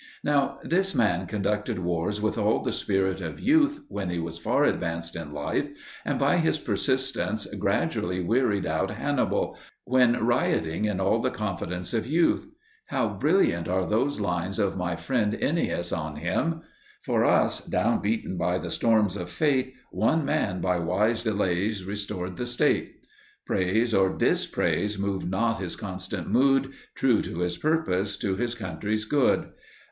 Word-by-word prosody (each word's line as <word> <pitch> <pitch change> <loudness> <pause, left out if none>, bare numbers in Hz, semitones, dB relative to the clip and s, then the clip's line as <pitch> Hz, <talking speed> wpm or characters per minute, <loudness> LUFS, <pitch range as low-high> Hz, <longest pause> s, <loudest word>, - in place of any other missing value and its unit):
Now 140 -1 +1
this 190 +2 +1
man 95 -5 +2
conducted 105 +1 -1
wars 90 +3 -1
with 110 +1 0
all - - +1
the - - -1
spirit 95 -1 0
of 80 - -5
youth 295 +3 +3
when 95 -3 -4
he 90 - -2
was 85 0 -4
far - - +2
advanced 85 0 -1
in 80 -3 -6
life, 75 0 -2 0.3
and - - -1
by - - +3
his 160 -2 +2
persistence 130 -7 -1
gradually 90 +1 0
wearied 105 +1 +1
out 80 0 0
Hannibal, - - -1 0.3
when 125 -1 +4
rioting 85 -7 +1
in 105 -3 -1
all 95 +4 +2
the 130 - +1
confidence 90 -5 -4
of 115 0 -1
youth. 165 - +2 0.4
How - - 0
brilliant 375 -5 +2
are 95 +1 +1
those 125 +8 0
lines 90 -1 -2
of 100 -3 +1
my 90 -2 -2
friend 105 +3 0
Ennius 140 - 0
on 75 -2 -3
him! 95 - -1 0.4
For - - +1
us, - - +3
down - - +1
beaten 100 -3 -1
by 90 +1 +1
the 85 -2 -5
storms 110 -3 +2
of 90 -3 -5
fate, 130 - +1 0.2
One 160 -2 +1
man 95 -8 0
by 90 -1 +1
wise 100 +7 +1
delays 100 -2 0
restored 100 -3 -4
the 125 - -3
State. 120 0 0 0.4
Praise 110 +6 +1
or 95 -1 +4
dispraise 105 0 +1
moved 100 -2 -2
not 115 +3 0
his 95 -3 -4
constant 95 -2 -5
mood, 135 0 +3 0.2
True 125 -5 +3
to 85 - -5
his 90 -1 -1
purpose, 100 - 0
to 100 -4 -1
his 120 +4 -2
country's 105 +1 -3
good! 140 +2 +2
100 Hz, 155 wpm, -26 LUFS, 90-120 Hz, 0.4 s, when